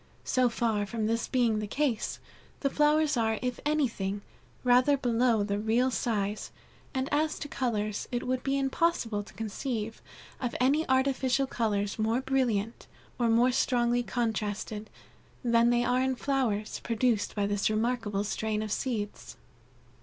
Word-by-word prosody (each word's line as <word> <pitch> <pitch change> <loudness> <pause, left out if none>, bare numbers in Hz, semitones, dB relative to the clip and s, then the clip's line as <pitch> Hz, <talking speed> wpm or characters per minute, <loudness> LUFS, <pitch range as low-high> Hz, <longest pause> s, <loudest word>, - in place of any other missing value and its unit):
So 255 -1 +3
far 225 -3 0
from 220 +1 -2
this 230 +1 0
being 235 -4 +2
the 210 - -3
case, 270 -1 -1 0.4
the 275 - +1
flowers 300 -1 +3
are, 220 -1 +1
if 250 -1 -2
anything, 220 -10 0 0.4
rather 255 +3 +5
below 240 -3 +2
the 205 0 -1
real 235 +4 +2
size, 210 -4 -1 0.4
and 260 0 -1
as 310 +1 +1
to - - -5
colors, 215 -7 -2
it 245 0 -2
would 255 0 0
be 275 0 0
impossible 270 -6 0
to 205 - -13
conceive 225 0 -4 0.4
of 245 -2 -2
any 280 +5 +2
artificial 265 0 +2
colors 210 -5 -1
more 220 +3 +2
brilliant, 245 -5 -1 0.3
or 235 -1 +2
more 235 +3 +4
strongly 245 -1 +2
contrasted, 215 -3 -2 0.5
than 235 -1 +4
they 240 0 +3
are 250 +1 +2
in 260 0 +1
flowers, 245 -6 -1
produced 230 -2 0
by 205 -1 +1
this 205 0 +1
remarkable 215 -2 0
strain 215 +1 -2
of 215 - -5
seeds." 215 -4 -3
235 Hz, 145 wpm, -29 LUFS, 215-260 Hz, 0.5 s, rather